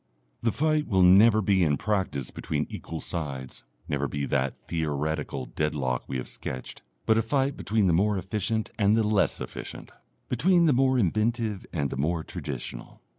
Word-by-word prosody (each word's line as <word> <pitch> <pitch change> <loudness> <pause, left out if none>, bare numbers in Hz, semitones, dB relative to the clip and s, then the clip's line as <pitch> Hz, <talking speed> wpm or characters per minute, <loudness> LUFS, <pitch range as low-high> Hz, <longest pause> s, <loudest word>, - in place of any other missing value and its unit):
The 115 - +1
fight 155 +2 +1
will 95 -5 +3
never 105 +4 +6
be 95 -2 +3
in 75 -3 +2
practice 95 - -1
between - - -2
equal 80 -1 -6
sides, 70 -6 -5 0.2
never 70 0 -1
be 70 0 -3
that 65 -2 0
theoretical 75 -3 -2
deadlock 70 -5 -2
we 65 - -2
have 65 - -5
sketched, 65 0 -6 0.2
but 110 0 +4
a - - +3
fight 135 +4 0
between 110 -1 +1
the 90 - +3
more 100 +4 +2
efficient 105 +4 -2
and 105 +1 +4
the 115 - +3
less 105 -1 +2
efficient, - - -7 0.4
between 170 +8 +3
the 155 - +4
more 130 +1 +3
inventive 110 +1 0
and 70 -6 -1
the - - -4
more 80 +4 0
traditional. - - -6
95 Hz, 170 wpm, -27 LUFS, 75-110 Hz, 0.4 s, never